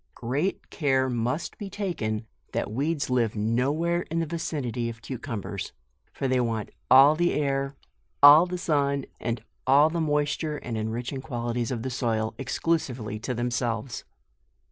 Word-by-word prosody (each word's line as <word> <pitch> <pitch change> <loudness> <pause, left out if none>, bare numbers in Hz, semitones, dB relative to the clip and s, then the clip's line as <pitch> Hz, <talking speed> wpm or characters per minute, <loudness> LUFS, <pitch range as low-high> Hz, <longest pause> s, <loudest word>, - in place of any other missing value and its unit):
Great 140 +11 -2
care 130 -4 +1
must 125 +6 -2
be 205 -2 -5
taken 115 - -3 0.3
that - - -1
weeds 140 +4 -1
live 120 -4 +1
no 115 +6 +1
where 170 +3 0
in 165 - -2
the 165 - +1
vicinity 140 -7 -3
of 115 -1 -8
cu 125 +1 -6
cumbers, 115 -7 -5 0.4
for 135 - -2
they 130 -1 +2
want 115 -3 -1 0.2
all 135 +3 +8
the 175 +2 +2
air, 140 -1 0 0.5
all 150 +5 +10
the 180 0 -3
sun, 140 -5 +1
and 115 -2 -3 0.2
all 145 +4 +6
the 170 0 -1
moisture 150 0 0
and 120 -5 -5
enriching 115 +5 -3
quali 120 -4 -3
ties 120 -1 -1
of 115 -3 -3
the 130 - -3
soil, 115 -3 -1
exclusively 125 -6 -1
to 125 +3 -3
themselves. 120 0 -2
130 Hz, 160 wpm, -27 LUFS, 115-150 Hz, 0.5 s, all